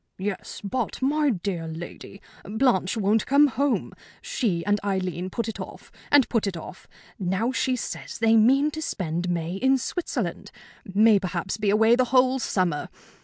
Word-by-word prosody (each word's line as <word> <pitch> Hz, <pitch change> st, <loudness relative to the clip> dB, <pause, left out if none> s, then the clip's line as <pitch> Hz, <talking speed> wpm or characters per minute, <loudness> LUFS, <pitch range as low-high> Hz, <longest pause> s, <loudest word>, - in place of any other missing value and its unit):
"Yes, 195 Hz, 0 st, -5 dB
but, 230 Hz, +6 st, -3 dB
my 295 Hz, +3 st, +2 dB
dear 180 Hz, -6 st, -2 dB
lady, 170 Hz, +4 st, -9 dB, 0.2 s
Blanche 220 Hz, -3 st, +1 dB
won't 210 Hz, +1 st, +1 dB
come 285 Hz, +2 st, +6 dB
home! 275 Hz, 0 st, 0 dB, 0.3 s
She 230 Hz, -, -2 dB
and 205 Hz, 0 st, +2 dB
Aileen 185 Hz, -2 st, -2 dB
put 230 Hz, +3 st, -3 dB
it 225 Hz, -, -5 dB
off, -, -, -9 dB, 0.2 s
and 285 Hz, -3 st, +6 dB
put 225 Hz, -4 st, 0 dB
it 185 Hz, -3 st, -3 dB
off. 170 Hz, +3 st, -10 dB, 0.3 s
Now 195 Hz, +6 st, 0 dB
she 255 Hz, 0 st, 0 dB
says 250 Hz, -, -6 dB
they 225 Hz, 0 st, +4 dB
mean 270 Hz, +7 st, +4 dB
to 315 Hz, -, -6 dB
spend 175 Hz, -, -3 dB
May 170 Hz, -1 st, -2 dB
in 265 Hz, +5 st, +3 dB
Switzerland 345 Hz, +7 st, -3 dB, 0.3 s
may 210 Hz, +2 st, +4 dB
perhaps 185 Hz, 0 st, -3 dB
be 210 Hz, -2 st, 0 dB
away 220 Hz, +3 st, +5 dB
the 255 Hz, 0 st, +2 dB
whole 255 Hz, +1 st, +3 dB
summer! 180 Hz, -9 st, -1 dB
210 Hz, 165 wpm, -25 LUFS, 185-255 Hz, 0.3 s, come